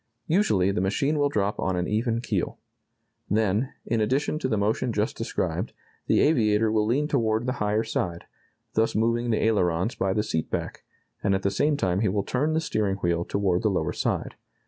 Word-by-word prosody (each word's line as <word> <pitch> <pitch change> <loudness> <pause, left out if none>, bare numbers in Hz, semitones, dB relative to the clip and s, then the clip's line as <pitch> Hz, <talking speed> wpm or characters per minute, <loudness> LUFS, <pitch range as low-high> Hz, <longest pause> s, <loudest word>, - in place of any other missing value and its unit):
Usually, 130 - +2
the 95 - -1
machine 140 +10 +1
will 145 0 +3
drop 105 -4 -1
on 95 -1 0
an 90 0 -1
even 115 +2 0
keel. - - -2 0.7
Then, 110 +4 +1
in 115 -2 0
addition 135 +7 0
to 145 - -1
the 110 -4 0
motion 110 +4 0
just 105 0 -1
described, - - -2 0.3
the - - +4
aviator 110 -7 +3
will 105 -1 +2
lean 140 +6 +1
toward 115 -5 +1
the 125 - 0
higher 105 +1 +1
side, 90 -6 -3 0.5
thus 110 +1 +1
moving 115 +2 +1
the 110 - +1
ailerons 95 -2 +1
by 95 -1 0
the 105 - +1
seat 80 -7 -2
back, - - -4 0.4
and 100 -1 +2
at 95 - -2
the 100 - +1
same 145 +5 +1
time 95 -8 0
he 105 -2 +2
will 100 +1 0
turn 145 +8 0
the 160 - +1
steering 105 -10 0
wheel 85 -3 0
toward 95 -2 0
the 110 - +2
lower 90 -5 -1
side. - - -2
110 Hz, 195 wpm, -26 LUFS, 95-120 Hz, 0.7 s, the